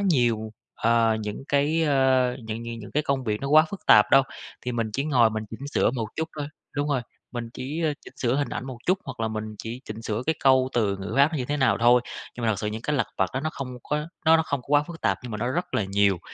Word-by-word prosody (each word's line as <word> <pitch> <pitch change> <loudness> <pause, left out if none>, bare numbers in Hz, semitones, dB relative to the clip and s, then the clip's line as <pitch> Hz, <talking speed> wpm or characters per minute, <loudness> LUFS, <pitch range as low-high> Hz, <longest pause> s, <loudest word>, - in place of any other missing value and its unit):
nhiều, 120 - +1 0.2
ờ, 115 -1 +3
những 105 +4 -5
cái, 145 +3 +2
ơ, 130 -4 +3
những 110 +1 -5
những 115 0 -6
những 105 - -10
cái 150 - +1
công 135 -2 -1
việc 105 -2 -1
nó 140 - -3
quá 155 +2 +7
phức 200 - -8
tạp 105 -1 +7
đâu, 135 - +7 0.4
thì 125 - -4
mình 115 -2 -1
chỉ 135 +6 -1
ngồi 125 -7 +4
mình 110 0 -3
chỉnh 130 +5 -7
sửa - - +3
một 115 -4 -3
chút 160 0 -2
thôi, 145 - -2 0.3
đúng 145 +1 0
rồi, 135 -4 +1 0.3
mình 120 -2 -4
chỉ, 150 +6 -4
ơ, 155 -2 +2
chỉnh - - -13
sửa 120 -1 0
hình 145 0 0
ảnh - - -5
một 130 -3 -7
chút, 185 +2 +3
hoặc - - -7
là 110 - 0
mình 110 -1 -3
chỉ 115 +4 -6
chỉnh 110 +1 -7
sửa 110 +1 -2
cái 160 - +2
câu 130 -1 +5
từ 105 -4 +1
ngữ 95 +1 -5
áp 140 +1 +7
nó - - -1
như 125 - -2
thế 145 +4 -1
nào 135 -4 +3
thôi, 120 +1 +6 0.3
nhưng 120 - -5
mà - - +3
thật - - -3
sự 105 - -3
những 110 +2 -4
cái 150 +3 0
lặt 135 - +1
vặt - - +2
đó 130 - 0
nó 155 +2 -2
không 130 -2 -6
có, 150 +1 -2 0.2
nó 160 +1 +8
nó 160 - +2
không 140 -4 -3
có - - -24
quá 145 0 +4
phức 165 +2 -10
tạp - - +1
nhưng 125 -2 -7
mà 105 - -3
nó 120 +3 -1
rất 175 +5 -3
là 110 - +1
nhiều, 100 -1 +2
125 Hz, 285 wpm, -25 LUFS, 110-145 Hz, 0.4 s, nó